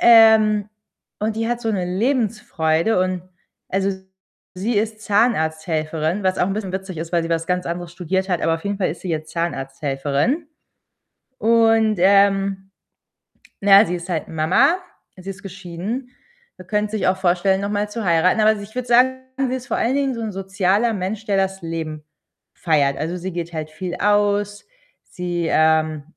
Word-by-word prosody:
Ähm, 220 Hz, -3 st, +6 dB, 0.5 s
und 215 Hz, +1 st, -1 dB
die 225 Hz, 0 st, -1 dB
hat 240 Hz, 0 st, -1 dB
so 225 Hz, -2 st, -1 dB
'ne 185 Hz, -3 st, -1 dB
Lebensfreude 200 Hz, -, 0 dB
und 185 Hz, -1 st, -1 dB, 0.5 s
also, 195 Hz, +1 st, 0 dB, 0.6 s
sie 205 Hz, +6 st, -2 dB
ist 215 Hz, +1 st, -1 dB
Zahnarzthelferin, 160 Hz, -5 st, 0 dB
was 185 Hz, 0 st, +2 dB
auch -, -, +2 dB
'n -, -, -1 dB
bisschen 200 Hz, -3 st, -4 dB
witzig 190 Hz, -2 st, -5 dB
ist, 165 Hz, +1 st, -6 dB
weil 170 Hz, -1 st, +2 dB
sie 165 Hz, -, -5 dB
was 165 Hz, 0 st, 0 dB
ganz 180 Hz, 0 st, -1 dB
anderes 175 Hz, 0 st, -5 dB
studiert 190 Hz, +2 st, -2 dB
hat, 180 Hz, -2 st, 0 dB
aber 165 Hz, 0 st, +2 dB
auf 165 Hz, -, -14 dB
jeden 200 Hz, 0 st, -2 dB
Fall 185 Hz, -, +1 dB
ist 165 Hz, -, -8 dB
sie 185 Hz, -, -5 dB
jetzt 155 Hz, -1 st, -3 dB
Zahnarzthelferin 145 Hz, -, -2 dB, 0.9 s
und, 225 Hz, -1 st, +4 dB
ähm, 195 Hz, 0 st, +3 dB, 0.9 s
na 200 Hz, 0 st, +2 dB
ja, -, -, +3 dB
sie 180 Hz, -, -2 dB
ist 170 Hz, 0 st, -7 dB
halt 160 Hz, -3 st, -2 dB
Mama, 185 Hz, -, +3 dB, 0.4 s
sie 185 Hz, +1 st, -9 dB
ist 200 Hz, -, -12 dB
geschieden 195 Hz, +6 st, -6 dB, 0.5 s
und 185 Hz, -1 st, -13 dB
könnte 210 Hz, 0 st, 0 dB
sich 215 Hz, -, 0 dB
auch 185 Hz, +1 st, +2 dB
vorstellen, 190 Hz, +1 st, +1 dB
noch 200 Hz, -, -2 dB
mal 205 Hz, 0 st, -1 dB
zu 225 Hz, +1 st, -5 dB
heiraten, 175 Hz, +4 st, +3 dB
aber 215 Hz, -, +5 dB
also, 215 Hz, -2 st, -3 dB
ich 210 Hz, +3 st, -13 dB
würde 250 Hz, -1 st, -3 dB
sagen, 255 Hz, +2 st, +4 dB, 0.3 s
sie 255 Hz, -, -1 dB
ist 250 Hz, -1 st, -7 dB
vor 235 Hz, -, -1 dB
allen 250 Hz, +4 st, +1 dB
Dingen 275 Hz, -2 st, 0 dB
so 230 Hz, -, -5 dB
'n 220 Hz, -2 st, -3 dB
sozialer 195 Hz, +4 st, +1 dB
Mensch, 205 Hz, +3 st, -4 dB
der 205 Hz, -3 st, 0 dB
das 190 Hz, 0 st, -1 dB
Leben 160 Hz, -2 st, -5 dB, 0.5 s
feiert. 145 Hz, -5 st, +1 dB
Also, 165 Hz, +4 st, -3 dB
sie 185 Hz, +1 st, -5 dB
geht 170 Hz, -1 st, -4 dB
halt 155 Hz, -1 st, -5 dB
viel 180 Hz, +3 st, -5 dB
aus. 205 Hz, 0 st, +1 dB, 0.5 s
Sie, 175 Hz, -2 st, -3 dB
ähm, 155 Hz, -1 st, +2 dB
190 Hz, 180 wpm, -21 LUFS, 170-215 Hz, 0.9 s, Ähm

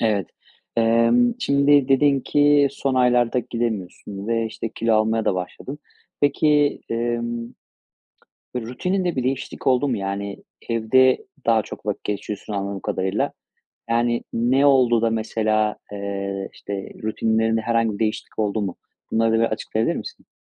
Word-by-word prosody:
Evet. 105 Hz, -5 st, +1 dB, 0.5 s
Emm, 115 Hz, -, +4 dB
şimdi 140 Hz, -, +3 dB
dedin 140 Hz, 0 st, +4 dB
ki 145 Hz, 0 st, +4 dB
son 135 Hz, -1 st, -2 dB
aylarda 125 Hz, -1 st, +3 dB
gidemiyorsun 105 Hz, -3 st, -4 dB
ve, 115 Hz, -1 st, +1 dB
işte, 115 Hz, +1 st, -5 dB
kilo 115 Hz, +1 st, 0 dB
almaya 110 Hz, +1 st, +2 dB
da -, -, +2 dB
başladın. 130 Hz, +10 st, -6 dB, 0.4 s
Peki, 145 Hz, 0 st, +3 dB
emm, 120 Hz, 0 st, -2 dB, 1.1 s
rutinin 180 Hz, -, -2 dB
de 175 Hz, -, 0 dB
bir 130 Hz, -, -1 dB
değişiklik 130 Hz, +1 st, -3 dB
oldu 130 Hz, +2 st, +3 dB
mu? 125 Hz, -, 0 dB
Yani 100 Hz, 0 st, -4 dB, 0.3 s
evde 125 Hz, +3 st, +3 dB, 0.2 s
daha 115 Hz, -1 st, +4 dB
çok -, -, -10 dB
vakit -, -, -3 dB
geçiriyorsun 105 Hz, +1 st, -4 dB
anladığım 100 Hz, 0 st, -3 dB
kadarıyla. 95 Hz, +2 st, -1 dB, 0.6 s
Yani 120 Hz, 0 st, +1 dB
ne 130 Hz, +5 st, +3 dB
oldu 125 Hz, -4 st, +4 dB
da 115 Hz, -, +2 dB
mesela, 110 Hz, -1 st, 0 dB, 0.2 s
eee, 100 Hz, -1 st, -4 dB
işte, 100 Hz, -, -7 dB, 0.3 s
rutinlerinde 110 Hz, +1 st, +1 dB
herhangi 115 Hz, 0 st, +1 dB
bir -, -, -7 dB
değişiklik 110 Hz, 0 st, -3 dB
oldu 105 Hz, 0 st, 0 dB
mu? 95 Hz, -3 st, -3 dB, 0.4 s
Bunları 115 Hz, 0 st, +2 dB
da 115 Hz, -, +3 dB
bir 115 Hz, -, +3 dB
açıklayabilir 110 Hz, 0 st, -1 dB
misin? -, -, -8 dB
115 Hz, 140 wpm, -22 LUFS, 110-130 Hz, 1.1 s, Emm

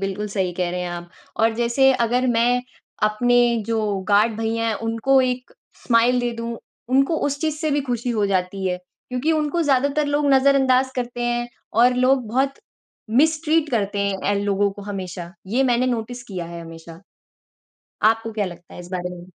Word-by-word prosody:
बिल्कुल, 195 Hz, +2 st, -3 dB
सही 190 Hz, -3 st, -1 dB
कह 175 Hz, 0 st, -2 dB
रहे 180 Hz, 0 st, -3 dB
हैं 180 Hz, -, -3 dB
आप 175 Hz, 0 st, -7 dB, 0.3 s
और 225 Hz, 0 st, +3 dB
जैसे 240 Hz, +3 st, +3 dB
अगर 245 Hz, +1 st, +1 dB
मैं 245 Hz, +1 st, +2 dB, 0.4 s
अपने 240 Hz, +3 st, +3 dB
जो 230 Hz, -1 st, 0 dB, 0.3 s
गार्ड 210 Hz, +2 st, +3 dB
भैया 225 Hz, +1 st, -1 dB
हैं 220 Hz, -, 0 dB
उनको 230 Hz, +4 st, +3 dB
एक 250 Hz, 0 st, -2 dB, 0.3 s
स्माइल 240 Hz, +1 st, +3 dB
दे 245 Hz, 0 st, -1 dB
दूँ, 230 Hz, 0 st, -4 dB, 0.3 s
उनको 275 Hz, +5 st, +3 dB
उस 285 Hz, 0 st, -2 dB
चीज़ 310 Hz, -2 st, -1 dB
से 310 Hz, 0 st, -1 dB
भी 290 Hz, 0 st, +1 dB
खुशी 245 Hz, -2 st, -2 dB
हो 215 Hz, -3 st, +1 dB
जाती 190 Hz, 0 st, -1 dB
है। 180 Hz, -1 st, -1 dB
क्योंकि 250 Hz, -, -4 dB
उनको 310 Hz, +2 st, 0 dB
ज़्यादातर 285 Hz, +1 st, +2 dB
लोग 290 Hz, 0 st, +1 dB
नज़र 270 Hz, +1 st, +5 dB
अंदाज़ 260 Hz, -1 st, +3 dB
करते 240 Hz, -1 st, -3 dB
हैं 240 Hz, 0 st, -1 dB, 0.2 s
और 245 Hz, +3 st, +4 dB
लोग 255 Hz, -1 st, +2 dB
बहुत 265 Hz, +4 st, +1 dB, 0.6 s
मिस्ट्रीट 315 Hz, +4 st, +2 dB
करते 205 Hz, -4 st, -1 dB
हैं 200 Hz, 0 st, 0 dB
इन 200 Hz, -, -1 dB
लोगों 200 Hz, 0 st, +1 dB
को 205 Hz, -, -10 dB
हमेशा, 185 Hz, -3 st, -6 dB
ये 235 Hz, +7 st, +1 dB
मैंने 250 Hz, -1 st, +2 dB
नोटिस 245 Hz, 0 st, -3 dB
किया 185 Hz, -8 st, -6 dB
है 170 Hz, 0 st, -8 dB
हमेशा। 165 Hz, 0 st, -11 dB, 1.1 s
आपको 225 Hz, 0 st, -1 dB
क्या 210 Hz, -2 st, -1 dB
लगता 175 Hz, -1 st, -10 dB
है -, -, -10 dB
इस 175 Hz, -, -9 dB
बारे 180 Hz, -1 st, -3 dB
में? 175 Hz, 0 st, -11 dB
235 Hz, 185 wpm, -22 LUFS, 200-260 Hz, 1.1 s, नज़र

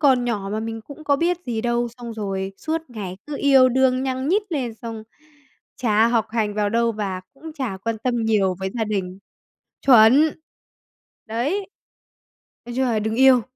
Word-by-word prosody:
còn 260 Hz, -5 st, +4 dB
nhỏ 205 Hz, -5 st, -2 dB
mà 215 Hz, -, -1 dB
mình 225 Hz, 0 st, -5 dB
cũng 300 Hz, +4 st, -12 dB
có 285 Hz, -1 st, +3 dB
biết 345 Hz, +3 st, +1 dB
gì 225 Hz, -2 st, -2 dB
đâu. 240 Hz, 0 st, 0 dB
Xong 235 Hz, -2 st, -7 dB
rồi 195 Hz, -2 st, -3 dB
suốt 320 Hz, +1 st, -3 dB
ngày 195 Hz, -5 st, -6 dB
cứ 295 Hz, -, -5 dB
yêu 265 Hz, -2 st, +6 dB
đương 260 Hz, 0 st, +2 dB
nhăng 260 Hz, +2 st, -2 dB
nhít 410 Hz, +4 st, +3 dB
lên 245 Hz, -6 st, -2 dB
xong 225 Hz, 0 st, -7 dB, 0.7 s
chả 220 Hz, -2 st, +3 dB
học 230 Hz, -2 st, +1 dB
hành 215 Hz, -3 st, -1 dB
vào 210 Hz, -1 st, +1 dB
đâu, 230 Hz, 0 st, +2 dB
và 195 Hz, -3 st, -3 dB
cũng 320 Hz, +3 st, -10 dB
chả 260 Hz, -10 st, -4 dB
quan 225 Hz, +2 st, -3 dB
tâm 245 Hz, +1 st, -1 dB
nhiều 200 Hz, -4 st, +2 dB
với 190 Hz, 0 st, -2 dB
gia 225 Hz, -2 st, 0 dB
đình. 190 Hz, -3 st, -3 dB, 0.7 s
Chuẩn! 260 Hz, +5 st, +7 dB, 0.9 s
Đấy. 295 Hz, -, -2 dB, 1.0 s
Nói 240 Hz, -, -7 dB
chung 265 Hz, 0 st, +1 dB
là 225 Hz, -3 st, +1 dB
đừng 220 Hz, +1 st, -2 dB
yêu. 260 Hz, -1 st, +6 dB
235 Hz, 180 wpm, -22 LUFS, 215-265 Hz, 1.0 s, Chuẩn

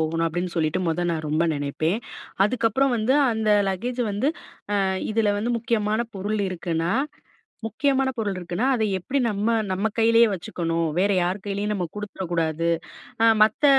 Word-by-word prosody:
போகணும்." 165 Hz, +1 st, 0 dB
அப்படீன்னு 175 Hz, +2 st, -3 dB
சொல்லிட்டு 160 Hz, +3 st, +1 dB
மொத 175 Hz, +2 st, 0 dB
நான் 155 Hz, -2 st, -2 dB
ரொம்ப 160 Hz, +3 st, +1 dB
நெனைப்பேன். 155 Hz, +8 st, -1 dB, 0.5 s
அதுக்கப்பறம் 250 Hz, +3 st, +1 dB
வந்து, 230 Hz, +5 st, +2 dB, 0.2 s
"அந்த 220 Hz, -1 st, -1 dB, 0.2 s
லக்கேஜ் 240 Hz, +7 st, -3 dB
வந்து 260 Hz, +9 st, +1 dB, 0.5 s
அ -, -, +2 dB, 0.3 s
இதில 215 Hz, -2 st, +2 dB
வந்து, 235 Hz, +3 st, -1 dB
முக்கியமான 220 Hz, -1 st, 0 dB, 0.2 s
பொருள் 210 Hz, +3 st, -2 dB
இருக்குன்னா 170 Hz, -1 st, -2 dB, 0.8 s
முக்கியமான 270 Hz, +3 st, +1 dB
பொருள் 205 Hz, -4 st, -1 dB
இருக்குனா, 175 Hz, +5 st, -3 dB
அதை 220 Hz, -3 st, +1 dB
எப்படி 255 Hz, +10 st, -2 dB
நம்ம 205 Hz, 0 st, -1 dB, 0.2 s
நம்ம 190 Hz, +4 st, 0 dB
கையிலயே 230 Hz, +1 st, +6 dB
வச்சுக்கணும். 170 Hz, -3 st, -2 dB
வேற 200 Hz, +2 st, +3 dB
யார் 180 Hz, +3 st, 0 dB
கையிலேயும் 205 Hz, +1 st, -2 dB
நம்ம 185 Hz, -4 st, -1 dB
கொடுத்துற 210 Hz, -2 st, -6 dB
கூடாது." 165 Hz, 0 st, 0 dB, 0.5 s
அ -, -, +6 dB, 0.2 s
மத்த 220 Hz, +7 st, +2 dB
200 Hz, 150 wpm, -24 LUFS, 170-225 Hz, 0.8 s, கையிலயே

